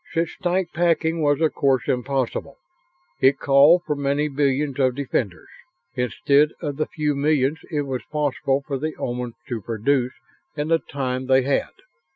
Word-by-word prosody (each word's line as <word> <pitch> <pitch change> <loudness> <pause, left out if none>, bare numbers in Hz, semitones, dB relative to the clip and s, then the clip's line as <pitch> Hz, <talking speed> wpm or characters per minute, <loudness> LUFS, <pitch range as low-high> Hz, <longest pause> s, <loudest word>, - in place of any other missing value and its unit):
Such 165 0 -1
tight 180 -1 -1
packing 165 -1 +1
was 145 0 +2
of 160 - +2
course 135 -3 +1
impossible. 135 +1 -2 0.6
It 135 +1 +5
called 145 +6 +5
for 150 - -1
many 140 +1 0
billions 140 0 0
of 130 -2 +2
defenders 125 -8 -3 0.5
instead 140 +4 +2
of 145 -2 -4
the 155 - -1
few 150 -1 -1
millions 145 0 +1
it 150 -3 -1
was 130 -2 -4
possible 140 -2 0
for 140 -3 -3
the 155 +2 -3
Omans 120 -1 -4
to 120 -3 -3
produce 125 +4 0 0.4
in 150 +1 -2
the 165 0 +4
time 130 -3 -4
they 130 0 +4
had. 140 +1 0
140 Hz, 160 wpm, -23 LUFS, 130-150 Hz, 0.6 s, It